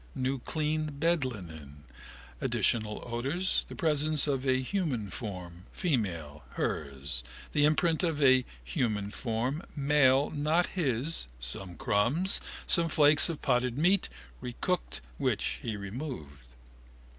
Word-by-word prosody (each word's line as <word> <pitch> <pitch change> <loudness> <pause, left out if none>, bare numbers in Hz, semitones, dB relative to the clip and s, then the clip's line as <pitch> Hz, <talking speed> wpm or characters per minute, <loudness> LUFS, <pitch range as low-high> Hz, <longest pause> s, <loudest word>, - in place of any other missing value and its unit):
New 130 +1 -1
clean 155 +3 -1
bedlinen, 95 - -2 0.6
additional 110 -2 0
odours, 135 +11 -1
the - - -7
presence 155 -3 +3
of 135 -2 -1
a 130 0 +3
human 130 - -2
form, 90 -4 -7
female, 85 - -2
hers, 70 -4 -2 0.3
the 145 -1 +3
imprint 160 +1 +2
of 165 -4 0
a 130 -2 +6 0.2
human 110 - -1
form, 125 +7 -2
male, 140 -1 +4
not 155 +4 +2
his, 140 - 0
some 85 +9 -6
crumbs, 135 - +1 0.2
some 170 -2 +4
flakes 150 +1 +5
of 165 - -5
potted 125 0 +1
meat, 180 +5 +3 0.3
recooked, 125 - -2 0.2
which - - 0
he 110 -3 -3
removed. 100 - -7
130 Hz, 115 wpm, -30 LUFS, 100-155 Hz, 0.6 s, a